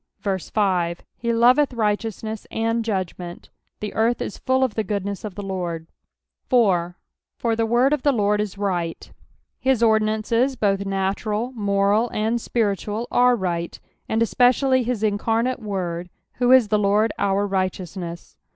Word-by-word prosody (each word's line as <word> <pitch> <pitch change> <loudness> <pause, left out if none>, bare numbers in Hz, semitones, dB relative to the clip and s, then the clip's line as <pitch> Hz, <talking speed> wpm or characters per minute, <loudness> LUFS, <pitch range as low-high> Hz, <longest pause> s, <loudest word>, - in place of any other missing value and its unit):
5 190 -3 -1
He 235 0 -2
loveth 250 +5 +4
righteousness 220 0 -2
and 225 +1 -1
judgment: 185 -4 -4 0.3
the 210 - -4
earth 230 +2 +1
is - - -5
full 260 0 +1
of 255 -5 0
the 220 - -1
goodness 200 -1 -3
of 205 -4 -6
the 205 - -6
Lord. 175 -4 -4 0.6
4, 180 -8 +2 0.2
" - - -65
For 230 -1 0
tit 225 0 0
word 250 +5 +3
of 300 - 0
tht 285 -1 +2
Lord 210 -1 +2
w 205 -1 -3
right." 175 -4 -3 0.5
His 260 -3 +2
ordinances 220 +4 +2
both 200 -3 0
natural, 200 +4 -1
moni, 205 0 +1
and 225 +2 0
spiritual, 215 0 -1
are 250 0 +4
right, 175 -5 -3 0.3
and 225 +1 +2
especially 255 +3 +3
his 240 -3 -2
incarnate 225 +4 0
Word, 180 -5 -4 0.3
who 245 0 +3
is 255 -5 +6
the 210 - +2
Lord 210 +2 +2
our 200 0 +1
righteousness. 185 -3 -4
210 Hz, 150 wpm, -23 LUFS, 195-235 Hz, 0.6 s, is